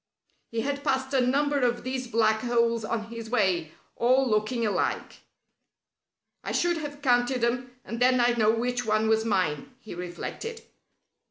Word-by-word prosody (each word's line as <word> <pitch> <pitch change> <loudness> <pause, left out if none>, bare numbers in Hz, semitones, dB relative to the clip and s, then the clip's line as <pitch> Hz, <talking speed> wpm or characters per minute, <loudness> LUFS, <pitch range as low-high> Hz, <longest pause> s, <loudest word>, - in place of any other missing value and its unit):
He 230 0 -2
had 280 +3 -3
passed 265 -1 0
a 265 - +4
number 285 +3 +2
of 245 -2 0
these 255 0 -3
black 220 -1 +2
holes 235 -1 +1
on 220 0 -3
his 230 -1 -7
way, 185 -9 +1 0.2
all 260 +3 +3
looking 225 +2 0
alike. 210 - -1 1.3
"I - - -4
should 345 -1 +1
have 290 -2 -7
counted 245 -1 +2
them, 245 +1 -1
and 230 - -5
then 255 0 +4
I'd 240 0 +2
know 215 -1 +4
which 245 +2 0
one 215 0 +1
was 220 0 +2
mine," 180 -9 -1
he 220 - -10
reflected. 180 - -6
240 Hz, 160 wpm, -27 LUFS, 220-255 Hz, 1.3 s, a